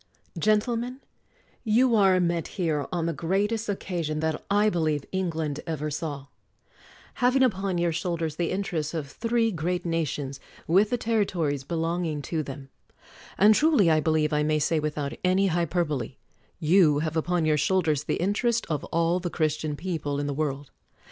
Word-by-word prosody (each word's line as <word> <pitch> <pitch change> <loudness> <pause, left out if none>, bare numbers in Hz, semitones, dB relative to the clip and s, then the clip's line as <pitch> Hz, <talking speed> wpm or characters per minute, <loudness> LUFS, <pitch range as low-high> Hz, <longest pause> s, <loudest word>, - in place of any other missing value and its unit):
Gentlemen: 230 - 0 0.4
— - - -36
You 250 -2 +4
are 190 -3 +5
met 170 -2 0
here 155 -6 0
on 175 -2 -1
the 170 - -1
great 190 +8 0
est 225 -1 -3
occasion 170 -6 -2
that, 160 -1 -2
I 205 +1 +3
believe, 155 -7 0
England 160 -6 -2
ever 155 -2 -3
saw; 145 -2 -4 1.0
having 255 +2 +4
upon 195 -6 0
your 170 0 +1
shoulders 165 -1 -2
the 170 0 -1
interests 170 -5 -2
of 155 -3 -3
three 230 +2 0
great 175 +1 -2
nations 150 -5 -2 0.3
with 195 +5 +4
the 245 - 0
territories 185 - 0
belonging 165 -1 -2
to 160 +1 -2
them; 135 -1 -8 0.7
and 210 +2 +7
truly, 250 - +4
I 155 - +4
believe 155 0 +1
I 150 - +2
may 155 0 +1
say 155 +2 +1
without 150 -2 -3
any 185 +2 +3
hyperbole, 165 - -1 0.4
you 160 -2 +4
have 160 0 -3
upon 170 +1 0
your 155 -1 +3
shoulders 155 -4 +1
the - - 0
interest 220 +5 0
of 150 -2 -1
all 170 +2 +1
the 180 -1 -3
Christian 155 -2 -1
people 150 -4 -3
in 145 - -2
the 145 - -2
world. 140 -1 -3
165 Hz, 165 wpm, -26 LUFS, 150-190 Hz, 1.0 s, and